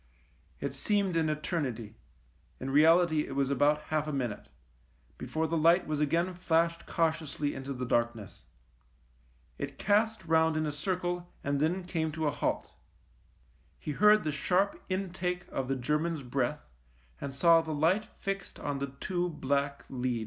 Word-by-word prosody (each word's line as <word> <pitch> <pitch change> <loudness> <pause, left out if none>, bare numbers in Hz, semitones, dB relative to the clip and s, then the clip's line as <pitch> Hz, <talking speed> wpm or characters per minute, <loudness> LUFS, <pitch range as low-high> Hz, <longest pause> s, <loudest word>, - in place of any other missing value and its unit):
It 140 -1 -3
seemed 195 +5 0
an 160 -1 +2
eternity 145 - -2 0.3
— 60 - -35
in 135 +1 -4
reality 160 +1 +5
it 135 - -6
was 140 0 +1
about 145 +2 +3
half 155 0 -1
a - - -2
minute 120 - -3 0.4
— - - -35
before 160 0 -2
the 165 +1 -1
light 170 +4 +5
was 155 -1 -2
again 165 +5 +1
flashed 170 -1 +1
cautiously 155 -3 0
into 135 +1 -6
the 125 -1 -3
darkness. 115 -4 -1 1.1
It - - -5
cast 215 0 +1
round 160 -1 +3
in 155 - 0
a 150 - -1
circle 175 +3 -3
and 140 0 0
then 170 +5 +1
came 165 -3 -2
to 160 0 -2
a 145 - +2
halt. - - -2 1.1
He 150 - -5
heard 210 +7 +5
the 155 - -1
sharp 180 +7 +1
intake 180 -1 -2
of 135 -1 -2
the 135 - 0
German's 150 +4 -1
breath, 125 - -2 0.5
and 135 -1 -5
saw 165 +3 +6
the 160 -1 -5
light 170 +8 +2
fixed 195 0 -4
on 145 -1 -3
the 140 - -2
two 180 -1 -1
black 140 -2 -1
leads. 125 -2 -2
155 Hz, 165 wpm, -30 LUFS, 140-175 Hz, 1.1 s, saw